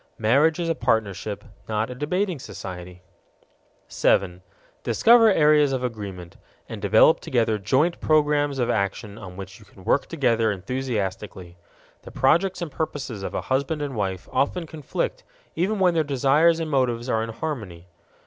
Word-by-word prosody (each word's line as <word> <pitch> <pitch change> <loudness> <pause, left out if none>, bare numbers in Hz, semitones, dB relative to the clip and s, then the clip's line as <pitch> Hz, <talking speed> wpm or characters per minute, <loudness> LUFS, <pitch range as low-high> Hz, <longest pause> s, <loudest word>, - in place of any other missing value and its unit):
Marriage 140 +9 +3
is 170 - -1
a 165 - +1
partnership, 110 - -1 0.3
not 110 +2 -1
a - - -4
debating 170 +6 -2
society. 90 -5 -9 0.8
7. 90 -2 +1 0.4
Discover 230 -1 +5
areas 150 -4 +4
of 130 -1 -2
agreement, 100 -7 -6 0.3
and - - -8
develop - - +5
together 115 -3 0
joint 135 - +1
programs 145 -2 +2
of 120 -2 0
action 100 0 -2
on 90 -2 -10
which 95 +1 -9
you 105 - -17
can 95 -1 -18
work 140 - +1
together 115 -8 +1
enthusiastically. 100 -4 -4 0.5
The - - -11
projects 175 +8 +1
and 160 - -6
purposes 135 -8 -4
of - - -5
a - - -1
husband 140 +3 -1
and 140 -3 -5
wife 95 -3 -3
often 165 +5 0
conflict 330 - -4 0.3
even 195 +6 0
when 185 -2 +3
their 160 -1 +2
desires 145 +4 +3
and 160 -1 -3
motives 125 -3 0
are 110 -3 +1
in 115 - -4
harmony. 110 - -6
130 Hz, 155 wpm, -24 LUFS, 105-155 Hz, 0.8 s, Discover